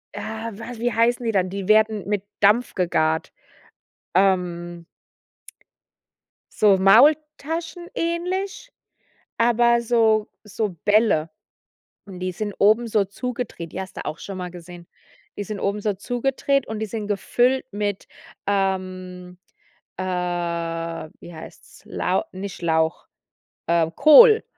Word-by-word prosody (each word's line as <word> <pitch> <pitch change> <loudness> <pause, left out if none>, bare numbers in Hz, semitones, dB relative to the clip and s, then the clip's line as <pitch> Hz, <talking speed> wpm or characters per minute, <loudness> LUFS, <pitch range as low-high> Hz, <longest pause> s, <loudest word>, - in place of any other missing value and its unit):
Ja, 220 +1 -5
wa 235 +1 -8
wie 240 0 -1
heißen 235 +2 +2
die 225 - +1
dann? 185 -3 +1
Die 195 0 -5
werden 215 -1 +3
mit 205 -2 -1 0.2
Dampf 215 +5 +3
gegart. 160 -3 0 0.8
Ähm 175 -3 0 1.7
So 205 -3 +4
Maultaschen 305 - +3
ähnlich, 365 +7 -3 0.7
aber 235 0 +3
so 220 -2 +2 0.2
so 210 0 -3
Bälle. 205 -7 +3 0.8
Und 190 -3 -10
die 185 0 -2
sind 205 +3 -4
oben 220 +3 +4
so 210 -3 +1
zugedreht. 235 -5 -6
Die 190 - -4
hast 190 - -10
du - - -6
auch 155 - -5
schon 195 -2 -7
mal 180 -1 -5
gesehen. 175 0 -12 0.5
Die 205 - -3
sind 205 0 -6
oben 200 +1 -1
so 210 -1 0
zugedreht 260 +5 -1
und 220 -1 -5
die 220 - -2
sind 215 -1 -5
gefüllt 245 +6 +1
mit, 205 -1 -3 0.4
ähm, 185 -2 -2 0.6
äh, 185 - -3
wie 170 -2 -4
heißt's? 160 - -13
Lau - - -1
nicht 190 0 -7
Lauch, 160 -1 0 0.6
ähm, 165 -1 +1
Kohl. 440 +8 +8
205 Hz, 125 wpm, -23 LUFS, 180-235 Hz, 1.7 s, Kohl